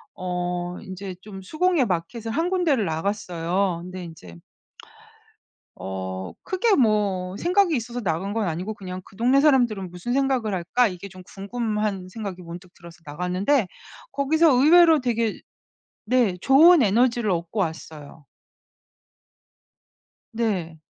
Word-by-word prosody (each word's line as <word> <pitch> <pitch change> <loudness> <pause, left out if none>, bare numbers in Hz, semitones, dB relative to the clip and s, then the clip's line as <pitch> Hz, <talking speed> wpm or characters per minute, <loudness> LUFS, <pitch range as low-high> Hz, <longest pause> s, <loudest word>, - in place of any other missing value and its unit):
어 180 -1 -3
인제 190 0 -8
좀 195 -1 -10
수공예 315 - +1
마켓을 195 +5 -3
1 325 +8 0
군데를 330 - +1
나갔어요. 175 +1 -1
근데 185 0 -8
인제 160 - -11 1.4
어 95 -1 -6
크게 405 +3 +1
뭐 205 -6 +1
생각이 360 -1 +2
있어서 240 +1 -4
나간 190 +2 -2
건 225 -2 0
아니고 180 +6 -3
그냥 185 -2 -7
'그 - - -18
동네 250 +5 +3
사람들은 240 - +2
무슨 180 +7 -5
생각을 260 -5 0
할까?' 190 +7 +1
이게 185 +1 -8
좀 185 0 -13
궁금한 210 -2 -3
생각이 190 -2 -7
문득 175 +2 -11
들어서 170 0 -14
나갔는데 180 - 0 0.4
거기서 315 +3 +3
의외로 320 +4 +6
되게 230 -3 -1 0.7
네 235 -5 +2
좋은 310 - +6
에너지를 235 +1 +2
얻고 170 +4 -2
왔어요. 160 -3 -6 2.1
네. 185 -9 -2
200 Hz, 265 characters per minute, -24 LUFS, 180-245 Hz, 2.1 s, 의외로